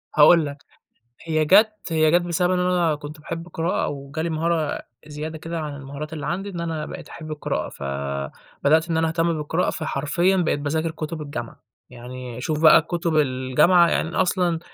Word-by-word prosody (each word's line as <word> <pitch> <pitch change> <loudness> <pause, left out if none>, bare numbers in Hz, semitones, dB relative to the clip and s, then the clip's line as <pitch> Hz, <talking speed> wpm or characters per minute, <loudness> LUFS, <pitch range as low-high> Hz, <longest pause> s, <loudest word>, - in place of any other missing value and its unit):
هاقول 155 +1 +7
لك، 145 0 -8 0.6
هي 155 -2 +1
جات 215 +5 +5
هي 155 -1 +3
جات 175 +2 +4
بسبب 175 +1 0
إن 180 - +1
أنا 175 -3 +2
كنت 150 +1 -9
باحب 165 +2 -6
القراءة، 170 0 -1
وجالي 145 +4 -4
مهارة 160 -1 -1 0.3
زيادة 155 +1 -6
كده 165 +1 -5
عن 150 -2 -5
المهارات 140 +2 -7
اللي 155 -2 -5
عندي، 195 +4 -3
إن 175 -3 -6
أنا 160 -2 -3
بقيت - - -9
أحب 155 -2 -8
القراءة، 150 - -3
ف - - -10 0.8
بدأت 160 +3 +4
إن 165 - +1
أنا 160 0 +2
أهتم 165 +1 +1
بالقراءة 160 +4 0
فحرفيًا 170 +7 0
بقيت 165 -4 +1
باذاكر 160 +3 -1
كُتب 160 0 -5
الجامعة، 120 -6 -6 0.3
يعني 125 0 -8
شوف 155 +3 -1
بقى 160 - +8
كُتب 170 0 -2
الجامعة 150 +6 +4
يعني 160 - 0
أنا 175 - 0
أصلًا 180 -3 +1
160 Hz, 180 wpm, -23 LUFS, 150-170 Hz, 0.8 s, بقى